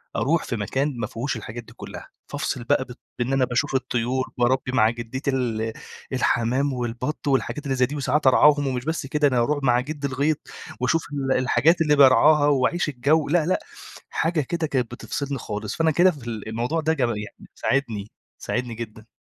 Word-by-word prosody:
أروح 160 +5 +1
في 120 - -3
مكان 130 +7 -1
ما 115 -2 -2
فيهوش 125 +6 -3
الحاجات 115 +2 -7
دي - - -16
كُلّها. - - -9 0.2
فافصل 125 - -3
بقى 130 +2 +2
بط 125 -2 -12 0.2
بإن 125 +2 0
أنا 130 -1 +3
باشوف 135 +3 -1
الطيور، 130 0 0
باربّي 130 +1 +1
مع 110 -4 +4
جدّتي 120 +4 -3
ال 115 -4 -1 0.4
الحمام 130 +5 +1
والبَط 125 +5 -4
والحاجات 140 +2 0
اللي 135 - 0
زي 125 -1 +3
دي، 145 +4 -6
وساعات 140 0 +1
أرعاهم 145 +1 +5
ومش 125 -1 -2
بس 160 -3 -2
كده، 150 +1 +2
أنا 130 -3 +1
أروح 145 +4 0
مع 120 -2 +4
جدّي 145 +2 -3
الغيط 140 +3 0 0.4
وأشوف 155 +6 +1
ال 135 -2 0
الحاجات 165 +6 +3
اللي 150 -2 +4
بارعاها 145 +2 +6
وأعيش 145 +4 +2
الجَو 145 +4 +1
لأ، 160 0 +3
لأ 185 - +1 0.5
حاجة 165 -1 0
كده 160 +3 -2
كانت 125 -5 -1
بتفصلني 140 +3 -4
خالص. 105 -1 -5
فأنا 160 -1 +2
كده 175 +5 +5
في 135 -7 -11
ال 110 -3 -5
الموضوع 120 +9 -1
ده 160 +1 +1
ج 150 - -7
يعني 105 -4 -3
ساعدني، 110 -7 -1 0.3
ساعدني 125 -2 -3
جدًا. 110 -1 -8
130 Hz, 185 wpm, -24 LUFS, 120-150 Hz, 0.5 s, بارعاها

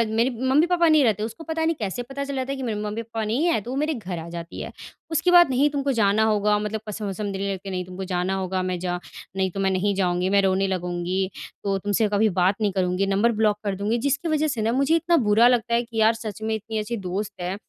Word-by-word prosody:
मेरे 235 +3 +3 0.2
मम्मी-पापा 340 +4 +4
नहीं 310 -3 +5
रहते 215 -3 +1
उसको 230 +9 -6
पता 320 0 -2
नहीं 330 - +1
कैसे 215 +4 -3
पता 275 +2 -5
चल 280 0 -4
जाता 260 +1 -2
है - - -2
कि 265 - -5
मेरे 215 -3 -2
मम्मी-पापा 225 +1 -4
नहीं 240 +10 0
हैं। 330 -11 +2
तो 245 - -6
वो - - -3
मेरे 305 +2 0
घर 190 -8 -5
आ 165 - -8
जाती 170 0 -7
है। - - -6 0.4
उसके 355 +3 +2
बाद 345 -4 +7
नहीं 275 +3 +3
तुमको 280 -1 -1
जाना 215 -2 +3
होगा 210 -1 +2
मतलब 210 +1 -3
कसम-वसम 205 -1 -4
देने 195 +1 -2
लगती 195 +1 -7
हैं, - - -5
नहीं, 180 -1 -2
तुमको 185 +1 -7
जाना 180 0 -1
होगा 185 -1 -2
मैं 185 -1 -2
जा 180 0 -2 0.4
नहीं 190 -1 +1
तो 195 - -6
मैं 190 0 +2
नहीं 195 +2 +1
जाऊँगी 180 -1 +1
मैं 200 0 +4
रोने 195 0 +2
लगूँगी, 180 +1 -2 0.3
तो 195 -1 0
तुमसे 205 +2 +1
कभी 215 +1 +3
बात 185 +2 +2
नहीं 205 -2 +2
करूँगी, 185 0 0
नंबर 205 +4 +2
ब्लॉक 215 -1 +1
कर 200 -2 -1
दूँगी। 210 +4 -1
जिसके 285 +5 0
वजह 310 0 +1
से 240 -6 -2
ना 225 +2 +1
मुझे 275 +6 +2
इतना 340 0 +2
बुरा 225 +3 +6
लगता 235 -1 +2
है 235 +1 +3
कि 230 -1 -9
यार 220 +1 +5
सच 220 -2 -7
में 220 0 -1
इतनी 220 +1 -5
अच्छी 230 +2 -3
दोस्त 195 +2 -4
है 180 +2 -2
210 Hz, 260 wpm, -24 LUFS, 190-245 Hz, 0.4 s, बाद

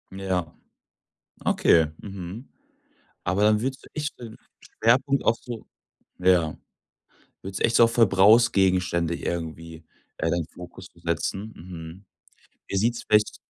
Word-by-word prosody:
Ja. 95 -4 -3 0.9
Okay. 80 -2 +4
Mhm. 100 +4 -8 0.7
Aber 95 +3 0
dann 105 0 +4
würdest 130 +3 -4
du - - -14
echt 150 0 -4
den 115 -2 -10 0.2
Schwerpunkt 130 +4 +1
auch 115 - +3
so 120 -3 -8 0.5
ja. 90 -4 +3 0.9
Würdest 95 0 -6
du - - +4
echt 115 - 0
so - - +7
auf 115 - +4
Verbrauchsgegenstände 95 -5 +4
irgendwie, 80 -1 -5 0.3
äh, 80 - -1
deinen 85 -2 -1
Fokus 90 +1 -11
so - - -21
setzen. 95 +5 -3
Mhm. 85 +2 -10 0.6
Wie - - -3
sieht's 115 +4 0
vielleicht 105 0 +3
95 Hz, 130 wpm, -25 LUFS, 85-115 Hz, 0.9 s, so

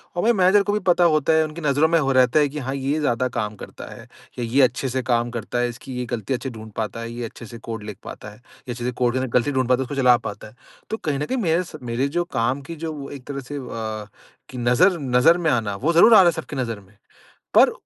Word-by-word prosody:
और 175 - -1
मेरे 235 +2 +4
मैनेजर 195 0 +4
को 205 +1 -1
भी 210 - +1
पता 180 -2 +3
होता 155 -2 +3
है 160 0 +4
उनकी 155 +2 -8
नज़रों 150 +1 +3
में 165 0 +3
हो 135 -3 +1
रहता 130 +2 +4
है 145 -1 +3
कि 150 +2 -6
हाँ 135 0 -3
ये 140 +3 -1
ज़्यादा 130 -4 +1
काम 105 -1 -2
करता - - -10
है - - -12 0.4
या - - -1
ये 125 +5 +2
अच्छे 130 +1 +1
से 130 +1 -1
काम 120 -1 +1
करता 120 0 -3
है, 120 0 +1
इसकी 125 +2 -9
ये 125 - -2
गलती 110 +1 -2
अच्छे 130 +1 -3
से - - -10
ढूँढ़ 110 0 -10
पाता 110 +1 -3
है, 115 0 -6
ये 120 +1 -5
अच्छे 115 +1 -10
से 115 +1 -10
कोड 115 -2 -6
लिख 105 -2 -8
पाता - - -9
है। 105 - -14
ये 125 +2 -13
अच्छे 120 0 -7
से 125 - 0
कोड 125 0 0
के 130 - -2
गलती 125 +3 +1
ढूँढ़ 130 -2 0
पाता 130 +1 +3
है - - +1
उसको 130 +2 -6
चला 125 -1 +6
पाता 115 - -7
है। 105 - -17 0.3
तो 220 - -2
कहीं 150 -9 -2
न 150 - -1
कहीं 260 - -2
मेरे 175 -5 +1
स 180 - -12
मेरे 120 +3 -1
जो 175 - +2
काम 125 +5 0
की 165 - -5
जो 155 -2 -5
एक 140 -3 -9
तरह 140 -1 -4
से 135 +2 -8
अ, 110 -5 -5 0.4
कि 130 - -9
नज़र 125 +10 +3
नज़र 135 +5 +4
में 165 -3 +1
आना 110 -5 0
वो 145 +12 0
ज़रूर 215 +8 +7
आ - - +10
रहा - - +5
है - - +2
सबकी 160 -2 -7
नज़र 115 -5 -3
में। 100 +1 -22 0.6
पर, - - +6
130 Hz, 285 wpm, -22 LUFS, 120-155 Hz, 0.6 s, आ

